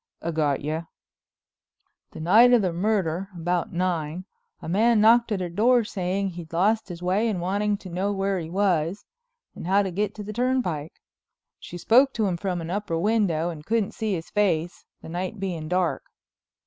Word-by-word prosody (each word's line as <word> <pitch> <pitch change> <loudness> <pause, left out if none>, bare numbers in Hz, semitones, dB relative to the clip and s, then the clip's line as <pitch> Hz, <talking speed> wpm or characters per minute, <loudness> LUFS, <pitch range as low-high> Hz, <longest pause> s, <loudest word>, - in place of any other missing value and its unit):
"I 170 - -3
got 150 -4 0
you." 155 +3 -3 1.2
"The - - -11
night 225 +9 +6
of 235 -4 +5
the 180 -2 0
murder, 190 -1 -1
about 175 +1 -1
nine, 175 -1 -2 0.3
a - - -9
man 220 +6 +3
knocked 230 +2 +5
at 200 -3 -1
her 180 - -2
door 235 +7 +3
saying 195 -2 -2
he'd 170 -3 -9
lost 205 +5 +1
his 175 0 -8
way 200 +6 +1
and 200 -5 -2
wanting 205 +3 0
to 195 - -12
know 185 +4 -1
where 195 -1 -1
he 160 -1 -6
was, 185 -1 0 0.5
and - - -8
how 200 +2 +3
to 190 - -3
get 205 +3 -2
to 210 - -7
the 210 +1 -6
turnpike. 240 - -1 0.7
She 175 - -9
spoke 255 +9 +4
to 220 - 0
him 185 -3 0
from 180 -1 -3
an 165 +1 -5
upper 195 -4 -2
window 175 -4 +1
and 155 -3 -9
couldn't 220 +2 0
see 215 -3 -2
his 165 -1 -7
face, 175 -5 0 0.2
the - - -9
night 185 +5 -4
being 175 -5 -4
dark. 180 0 0
185 Hz, 185 wpm, -25 LUFS, 170-210 Hz, 1.2 s, night